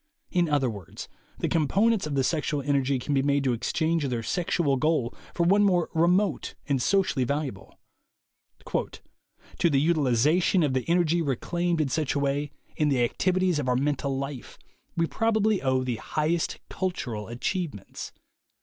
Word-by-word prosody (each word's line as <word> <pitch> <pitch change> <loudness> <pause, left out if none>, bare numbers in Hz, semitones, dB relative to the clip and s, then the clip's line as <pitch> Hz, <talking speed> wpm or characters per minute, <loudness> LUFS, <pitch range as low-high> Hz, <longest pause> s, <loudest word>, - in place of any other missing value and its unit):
In 175 -3 +2
other 145 -3 +2
words, 100 -8 -7 0.3
the - - -1
components 195 +5 +2
of 145 - -3
the 135 - +2
sexual 150 -1 -1
energy 140 -1 +1
can 135 +4 -3
be 135 - +3
made 140 0 +1
to 130 -2 +1
exchange 160 +6 0
their 120 -3 -2
sexual 170 - 0
goal 145 -4 0 0.2
for 170 - +1
one 200 +4 +4
more 180 -4 +2
remote 180 +5 +1
and 140 -4 +1
socially 185 -6 +2
valu 145 +5 -1
able. 95 -7 -10 1.8
"To 170 - +4
the 140 -3 +3
utilization 155 - +3
of 145 -3 +1
the 130 -1 -1
energy 170 -1 +3
reclaimed 170 +4 -1
in 150 -3 +1
such 150 0 -1
a - - +1
way, 140 +1 0 0.3
in 150 -1 +1
the 130 -3 +2
activities 185 +5 +1
of 130 -3 -1
our 125 - +2
mental 140 0 0
life, 135 -2 -6 0.4
we 165 - +3
probably 220 +1 +1
owe 130 -1 +1
the 125 -3 -2
highest 155 +6 -1
cultural 125 - -3
achievements. 125 - -4
150 Hz, 160 wpm, -26 LUFS, 130-170 Hz, 1.8 s, one